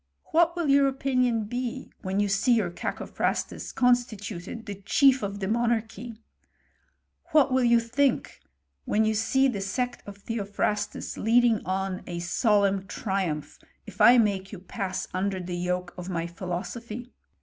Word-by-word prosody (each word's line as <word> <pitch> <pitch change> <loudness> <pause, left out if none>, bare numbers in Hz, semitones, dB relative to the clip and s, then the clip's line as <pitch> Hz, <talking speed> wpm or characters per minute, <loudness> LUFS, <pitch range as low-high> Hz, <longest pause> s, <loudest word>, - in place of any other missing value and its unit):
" - - -49
What 340 +1 +4
will 340 -3 -1
your 280 0 +5
opinion 255 -4 +1
be 245 +3 -4
when 190 +1 -2
you 205 - +2
see 200 +5 +3
youf 180 -6 -1
Cacophrastus - - -3
constituted 230 -4 -1
the 200 -2 -7
chief 270 +4 +4
of 200 -1 -4
the 190 - -2
monarchy? 230 0 -1 1.2
What 280 -4 +5
will 260 -1 +3
you 235 -1 +5
think 245 +4 0 0.5
when 220 +1 +2
you 220 - +2
see 245 +5 +2
the 215 -7 -2
sect 245 +6 -2
of 200 0 -9
Theo* 210 0 -4
phrastus 205 +1 -2
leading 230 0 +3
on 190 0 -2
a 175 - -4
solemn 195 +2 +1
triumph, 180 -10 -3 0.3
if 210 -2 -7
I 240 +4 +8
make 200 -4 +1
yon 200 -4 -8
pass 190 -1 -4
under 190 +1 -1
the 180 0 -5
yoke 180 0 -2
of 180 +1 -6
my 170 -2 -2
philosophy 215 +7 -6
210 Hz, 155 wpm, -27 LUFS, 190-245 Hz, 1.2 s, I